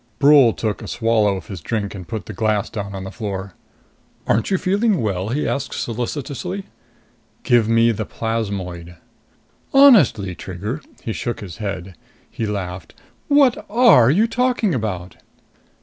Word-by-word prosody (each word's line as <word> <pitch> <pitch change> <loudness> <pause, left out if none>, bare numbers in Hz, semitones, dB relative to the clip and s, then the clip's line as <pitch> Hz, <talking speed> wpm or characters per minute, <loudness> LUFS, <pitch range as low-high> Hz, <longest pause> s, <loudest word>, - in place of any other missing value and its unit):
Brule 140 -3 +6
took 110 -2 -3
a - - -7
swallow 110 -4 +1
of - - -9
his 95 -5 -8
drink 105 +2 -3
and 95 -4 -9
put 110 +1 -5
the - - -7
glass 110 -2 0
down 100 -2 -5
on 95 - -5
the 95 - -7
floor. 100 -4 -5 0.7
"Aren't 110 +1 +1
you 190 - +2
feeling 200 +1 +1
well?" 100 -3 -2
he 140 +6 -1
asked 140 0 -3
solicitously. 140 - -4 0.8
"Give 120 -3 +3
me 115 +1 +4
the 110 0 -3
plasmoid." 95 -7 -4 0.8
"Honestly, 190 - +6
Trigger." 100 - -6 0.2
He 110 - -3
shook 120 +1 -4
his 90 -5 -8
head. 95 -3 -5 0.4
He 110 - -3
laughed. 95 -3 -5 0.3
"What 285 -4 +4
are 220 - +6
you 195 +10 +4
talking 240 -4 0
about?" 95 -7 -4
110 Hz, 150 wpm, -20 LUFS, 100-145 Hz, 0.8 s, Brule